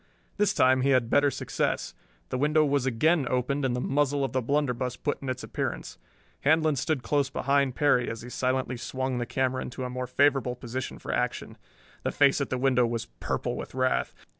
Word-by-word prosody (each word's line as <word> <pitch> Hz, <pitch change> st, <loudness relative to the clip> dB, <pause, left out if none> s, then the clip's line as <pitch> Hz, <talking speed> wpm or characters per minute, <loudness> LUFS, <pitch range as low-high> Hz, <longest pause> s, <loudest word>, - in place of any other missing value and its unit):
This 205 Hz, -1 st, +2 dB
time 130 Hz, 0 st, +4 dB
he 135 Hz, -, +2 dB
had 125 Hz, -3 st, +2 dB
better 145 Hz, 0 st, +4 dB
success. -, -, -2 dB, 0.4 s
The -, -, -2 dB
window 150 Hz, +2 st, +3 dB
was 140 Hz, -2 st, +1 dB
again 140 Hz, +4 st, +2 dB
opened 130 Hz, +3 st, 0 dB
and 130 Hz, -2 st, +1 dB
the -, -, -1 dB
muzzle 140 Hz, +1 st, +1 dB
of 130 Hz, -, -6 dB
the 130 Hz, -, +1 dB
blunderbuss 125 Hz, -2 st, -1 dB
put 145 Hz, -, -3 dB
in 135 Hz, -, -4 dB
its 130 Hz, 0 st, -3 dB
appearance. -, -, -4 dB, 0.4 s
Handlon 155 Hz, +1 st, +3 dB
stood 135 Hz, 0 st, -1 dB
close 140 Hz, +1 st, +1 dB
behind 140 Hz, -1 st, +1 dB
Perry 135 Hz, -4 st, +3 dB
as 115 Hz, -1 st, -6 dB
he 125 Hz, -, -8 dB
silently 130 Hz, 0 st, -1 dB
swung 130 Hz, +1 st, -3 dB
the 120 Hz, -, -3 dB
camera 130 Hz, 0 st, 0 dB
into 130 Hz, -, -6 dB
a 125 Hz, -, -4 dB
more 125 Hz, 0 st, -4 dB
favorable 130 Hz, -1 st, +2 dB
position 125 Hz, +1 st, -5 dB
for -, -, -5 dB
action. -, -, -2 dB, 0.5 s
The -, -, -1 dB
face 140 Hz, +1 st, +3 dB
at 140 Hz, -, -2 dB
the 130 Hz, -, -1 dB
window 125 Hz, -2 st, +3 dB
was 115 Hz, 0 st, -3 dB
purple -, -, -2 dB
with -, -, -7 dB
wrath. 130 Hz, 0 st, +1 dB
130 Hz, 200 wpm, -27 LUFS, 125-140 Hz, 0.5 s, time